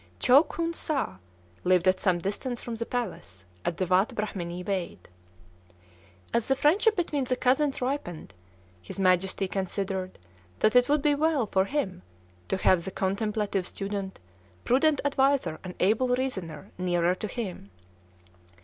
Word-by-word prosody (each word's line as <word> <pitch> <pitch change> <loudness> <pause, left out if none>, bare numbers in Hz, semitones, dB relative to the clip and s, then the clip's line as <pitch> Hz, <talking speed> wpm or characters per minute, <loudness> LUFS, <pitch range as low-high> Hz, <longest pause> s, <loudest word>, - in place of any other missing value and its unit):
Chow 260 - +6
Khoon 335 0 -3
Sâh 295 - -2 0.5
lived 180 0 +3
at 185 0 +4
some 185 -3 +2
distance 210 +7 -3
from 235 - -5
the 230 +1 -4
palace, 175 - -5 0.2
at 170 - -2
the 185 - 0
Watt 185 +3 +2
Brahmanee 180 -4 -4
Waid. 185 -2 -2 1.4
As 235 -1 +1
the 270 - +3
friendship 400 - +3
between 300 -6 -1
the 255 - 0
cousins 265 +2 +1
ripened, 250 - -4 0.5
his 90 - -9
Majesty 190 +1 +2
considered 190 0 -3 0.4
that 215 - +2
it 250 +1 +5
would 295 -1 +2
be 295 -1 +4
well 295 -3 +2
for 190 -2 +1
him 235 - -2 0.5
to - - 0
have 185 -2 +3
the 190 - -3
contemplative 200 0 -1
student, 195 -1 -4 0.5
prudent 290 +4 +3
adviser, 275 - +2
and 180 -1 -7
able 220 +7 +3
reasoner 190 - -4
nearer 175 -1 +2
to 200 +3 -5
him. 195 - -6
205 Hz, 145 wpm, -27 LUFS, 185-265 Hz, 1.4 s, Chow